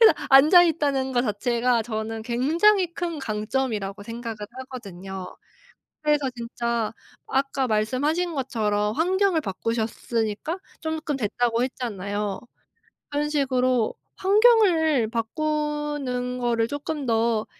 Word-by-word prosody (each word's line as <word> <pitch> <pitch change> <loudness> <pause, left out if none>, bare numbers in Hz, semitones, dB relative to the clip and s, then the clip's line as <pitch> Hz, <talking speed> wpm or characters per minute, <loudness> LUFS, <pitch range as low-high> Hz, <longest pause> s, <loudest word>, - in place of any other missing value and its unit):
그래서 450 - +9 0.2
앉아 300 +7 +8
있다는 280 -5 0
거 245 - +2
자체가 235 +2 +1
저는 220 0 -4
굉장히 335 - +2
큰 335 -2 -3
강점이라고 215 -3 -2
생각을 230 +1 -6 0.2
하거든요. 195 -8 -8 0.7
그래서 295 -3 +2
진짜 235 -1 -2 0.3
아까 270 -1 0
말씀하신 285 +11 0
것처럼 210 -6 0
환경을 370 +1 +2
바꾸셨으니까 225 - -2 0.2
조금 315 -2 -2
됐다고 235 +1 0
했잖아요. 205 -5 -3 0.7
그런 295 +1 -1
식으로 255 -5 +1 0.2
환경을 375 - +4
바꾸는 295 0 -2
거를 235 -2 +1
쪼끔 290 +2 -4
더 225 -2 +1
250 Hz, 265 characters per minute, -25 LUFS, 225-300 Hz, 0.7 s, 그래서